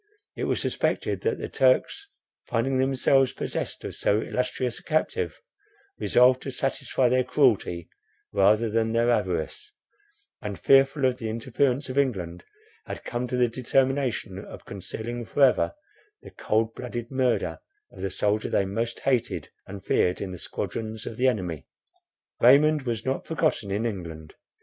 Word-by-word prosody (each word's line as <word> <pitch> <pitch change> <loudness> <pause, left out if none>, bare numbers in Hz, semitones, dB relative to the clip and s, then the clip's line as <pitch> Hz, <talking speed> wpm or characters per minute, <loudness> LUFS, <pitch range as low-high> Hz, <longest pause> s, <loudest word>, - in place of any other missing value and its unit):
It - - -2
was - - 0
suspected - - -1
that 455 - 0
the - - -4
Turks, 405 -5 +2 0.4
finding 130 +3 0
themselves 135 0 +3
possessed - - -4
of - - -5
so 105 - +1
illustrious 125 +1 -2
a - - -21
captive, 305 - -1 0.6
resolved 125 +1 +4
to - - -5
satisfy 135 -1 0
their 130 +1 +3
cruelty 115 - +2 0.5
rather 105 +3 +4
than 110 +1 0
their 115 +1 +3
avarice, 105 - -2 0.7
and 105 -4 -5
fearful 135 +1 +4
of 130 -1 +1
the 110 -3 -3
interference 130 +4 0
of 130 +1 0
England, 90 -11 -1 0.4
had - - -6
come 120 +1 -3
to 125 +1 -2
the 125 -1 +4
determination 130 -5 0
of - - -11
concealing 115 +5 -6
for 140 +5 +1
ever 135 - +4 0.5
the - - -11
cold 110 +1 0
blooded 120 -1 -6
murder 130 -2 0 0.3
of - - -12
the 95 - -1
soldier 105 +3 0
they 100 - +2
most 115 +4 -3
hated 130 -4 0 0.2
and 100 -1 -9
feared 90 0 +2
in 95 - -4
the 90 - -7
squadrons 110 +4 -5
of 115 - -6
their 130 +1 +4
enemy. 90 - -4 0.7
Raymond 145 +2 +5
was 115 -2 -2
not 130 +1 -2
forgotten 155 -10 0
in 105 +4 -1
England. 85 -8 -5
120 Hz, 155 wpm, -26 LUFS, 105-130 Hz, 0.7 s, Raymond